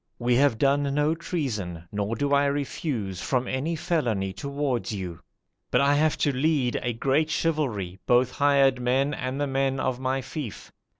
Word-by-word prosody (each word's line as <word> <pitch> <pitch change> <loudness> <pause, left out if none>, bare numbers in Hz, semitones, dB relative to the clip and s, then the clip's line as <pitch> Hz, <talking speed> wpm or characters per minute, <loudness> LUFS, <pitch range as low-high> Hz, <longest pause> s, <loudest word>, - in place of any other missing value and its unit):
we 120 0 +1
have 130 -2 +3
done 140 +2 +2
no 150 +2 +2
treason, 110 - -4
nor 105 +2 -2
do 140 +4 0
I 140 0 +4
refuse 140 - -2
from 125 -2 0
any 150 +6 -1
felony 115 - -1
towards 140 -3 -2
you; 90 -5 -5 0.5
but - - +3
I 140 +1 +4
have 155 +1 +2
to 145 - +3
lead 135 -3 +1
a 120 - -1
great 135 +7 +1
chivalry, 120 - -1
both 125 +1 +4
hired 140 -3 +3
men 135 +4 +1
and 130 0 -3
the 145 - +1
men 135 -1 0
of 130 -1 -1
my 130 +1 0
fief. 130 - -7
135 Hz, 170 wpm, -26 LUFS, 120-145 Hz, 0.5 s, I